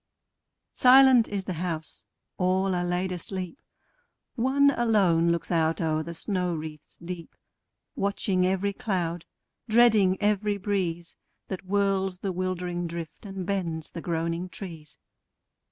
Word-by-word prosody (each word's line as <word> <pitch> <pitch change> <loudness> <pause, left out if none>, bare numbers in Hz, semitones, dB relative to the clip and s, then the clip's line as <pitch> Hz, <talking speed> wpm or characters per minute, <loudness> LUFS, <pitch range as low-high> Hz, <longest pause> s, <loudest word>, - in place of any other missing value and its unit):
Silent 255 -2 +7
is 200 -2 -3
the 185 - -3
house: 165 -4 -5 0.3
all 185 +1 +2
are 175 0 0
laid 180 +1 -1
asleep: 185 +4 -5 0.7
One 275 +3 +3
alone 195 -10 +3
looks 170 +1 -2
out 165 -1 +1
o'er 155 -2 0
the 170 +2 -7
snow 180 -1 -1
wreaths 155 -1 -8
deep, 170 0 -8 0.6
Watching 195 -2 0
every 190 +2 +1
cloud, 175 -5 -2 0.4
dreading 215 -5 +5
every 210 0 +1
breeze 180 -4 -2 0.3
That 190 - -4
whirls 195 -1 0
the 195 +1 -3
wildering 180 -1 -2
drift, 170 +3 -7
and 190 -2 -5
bends 170 -5 -3
the 165 - -6
groaning 170 +1 -2
trees. 165 -6 -8
185 Hz, 125 wpm, -27 LUFS, 170-200 Hz, 0.7 s, Silent